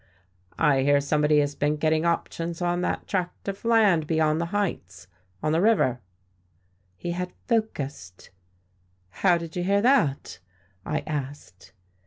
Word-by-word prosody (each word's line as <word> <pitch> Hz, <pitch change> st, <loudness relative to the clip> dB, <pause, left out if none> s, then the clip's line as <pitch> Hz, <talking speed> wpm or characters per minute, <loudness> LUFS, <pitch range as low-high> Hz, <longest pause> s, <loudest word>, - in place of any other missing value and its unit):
"I 145 Hz, -4 st, +3 dB
hear 145 Hz, +1 st, +4 dB
somebody 150 Hz, +1 st, +2 dB
has 145 Hz, 0 st, -1 dB
been 145 Hz, +1 st, 0 dB
getting 155 Hz, +1 st, +1 dB
options 170 Hz, 0 st, -2 dB
on 175 Hz, 0 st, 0 dB
that -, -, -2 dB
tract 180 Hz, -1 st, -3 dB
of 195 Hz, 0 st, -5 dB
land 210 Hz, -9 st, +3 dB
beyond 160 Hz, 0 st, +1 dB
the 170 Hz, -, -2 dB
Heights, 170 Hz, -, -3 dB, 0.4 s
on 155 Hz, -, +1 dB
the 165 Hz, +2 st, +2 dB
river." 185 Hz, -, +2 dB, 1.0 s
He 175 Hz, -, -4 dB
had 180 Hz, +1 st, -4 dB, 0.2 s
"focussed." 140 Hz, -, -3 dB, 0.9 s
"How 180 Hz, -3 st, +4 dB
did 165 Hz, -1 st, -8 dB
you 180 Hz, -, -1 dB
hear 200 Hz, +2 st, +2 dB
that?" 200 Hz, -, +1 dB, 0.5 s
I -, -, -1 dB
asked. 135 Hz, -11 st, -7 dB
160 Hz, 140 wpm, -25 LUFS, 145-180 Hz, 1.0 s, hear